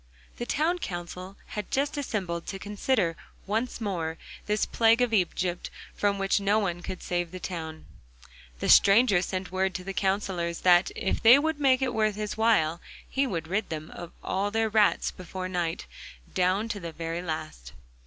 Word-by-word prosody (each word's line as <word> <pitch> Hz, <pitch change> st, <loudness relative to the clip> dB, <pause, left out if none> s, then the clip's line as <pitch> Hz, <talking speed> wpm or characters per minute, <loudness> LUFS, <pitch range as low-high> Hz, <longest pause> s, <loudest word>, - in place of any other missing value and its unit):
The 240 Hz, -, -4 dB
town 335 Hz, +4 st, +1 dB
council 180 Hz, -, -6 dB
had 210 Hz, -2 st, -5 dB
just 280 Hz, +3 st, 0 dB
assembled 190 Hz, -, -3 dB
to 195 Hz, -, -4 dB
consider 205 Hz, -2 st, 0 dB, 0.3 s
once 225 Hz, +5 st, -1 dB
more 170 Hz, -7 st, -2 dB, 0.3 s
this 210 Hz, +1 st, +1 dB
plague 230 Hz, 0 st, +4 dB
of 245 Hz, -2 st, +1 dB
Egypt, 180 Hz, -2 st, 0 dB, 0.2 s
from 200 Hz, -1 st, +1 dB
which 195 Hz, +1 st, +1 dB
no 200 Hz, +1 st, +2 dB
one 175 Hz, -5 st, -1 dB
could 185 Hz, +1 st, -6 dB
save 175 Hz, -1 st, -1 dB
the 185 Hz, +2 st, -8 dB
town. 160 Hz, -4 st, -6 dB, 0.7 s
The -, -, -3 dB
stranger 200 Hz, -2 st, +6 dB
sent 185 Hz, 0 st, -4 dB
word 190 Hz, 0 st, 0 dB
to 185 Hz, -, -4 dB
the 195 Hz, +1 st, -5 dB
counsellors 190 Hz, -4 st, -1 dB
that, 180 Hz, 0 st, +5 dB
if -, -, -1 dB
they 235 Hz, +4 st, +9 dB
would 315 Hz, +1 st, 0 dB
make 265 Hz, -2 st, +4 dB
it 255 Hz, -2 st, 0 dB
worth 215 Hz, -2 st, +1 dB
his 210 Hz, 0 st, -3 dB
while, 190 Hz, -8 st, +2 dB, 0.3 s
he 275 Hz, 0 st, 0 dB
would 165 Hz, -8 st, -3 dB
rid 195 Hz, +6 st, -1 dB
them 155 Hz, -1 st, -5 dB
of 175 Hz, -1 st, -8 dB
all 195 Hz, +2 st, 0 dB
their 225 Hz, +1 st, +1 dB
rats 210 Hz, -1 st, +3 dB
before 185 Hz, +1 st, -6 dB
night, 175 Hz, -3 st, -2 dB, 0.5 s
down 185 Hz, +4 st, +1 dB
to 205 Hz, -, -3 dB
the 170 Hz, -3 st, -6 dB
very 165 Hz, +1 st, -4 dB
last. 155 Hz, -, -6 dB
195 Hz, 175 wpm, -27 LUFS, 175-220 Hz, 0.7 s, they